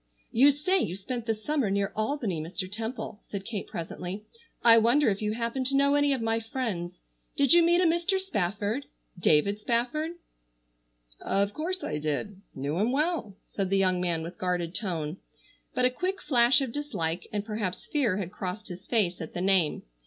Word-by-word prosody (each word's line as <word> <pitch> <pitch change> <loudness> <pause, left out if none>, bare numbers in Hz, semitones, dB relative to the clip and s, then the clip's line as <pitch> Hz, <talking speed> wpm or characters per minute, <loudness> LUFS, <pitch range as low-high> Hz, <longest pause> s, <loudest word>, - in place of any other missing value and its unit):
"You 270 +5 +6
say 300 +7 +2
you 180 - -1
spent 235 +4 -5
the 225 - +1
summer 260 +1 -1
near 200 0 0
Albany, 215 - -1
Mr. 185 +4 -4
Temple," 220 +1 -5
said 200 -1 -7
Kate 215 -4 -4
presently, 180 +4 -6 0.4
"I 230 -1 +8
wonder 240 +5 +4
if 200 0 -1
you 210 0 0
happen 235 +3 -2
to 275 +2 +1
know 280 +1 +4
any 290 0 +3
of 260 -4 0
my 225 0 +1
friends. 220 -7 -4 0.4
Did 280 +1 +5
you 345 - +8
meet 345 +1 +4
a - - +3
Mr. 345 +3 +2
Spafford? 210 - -2 0.3
David 175 +6 +3
Spafford?" 250 +9 0 1.1
"Of 200 +1 +1
course 360 +4 -3
I 150 - -2
did, 155 +7 -3
knew 140 +5 -2
him 220 +4 +2
well," 285 - -1
said 195 -2 -3
the 195 - +2
young 185 -2 +2
man 170 -3 0
with 170 +2 -8
guarded 180 -2 -1
tone. 170 -6 -3 0.6
But 250 - +3
a 250 - +3
quick 370 +9 -2
flash 250 -4 +4
of 265 -3 -2
dislike, 180 - -3
and 205 -1 -2
perhaps 210 -4 -3
fear 245 -11 +1
had 185 -3 -4
crossed 205 +3 -5
his 180 +1 -9
face 195 -8 +1
at 160 - -7
the - - -2
name. 185 -5 +2
215 Hz, 185 wpm, -28 LUFS, 185-270 Hz, 1.1 s, I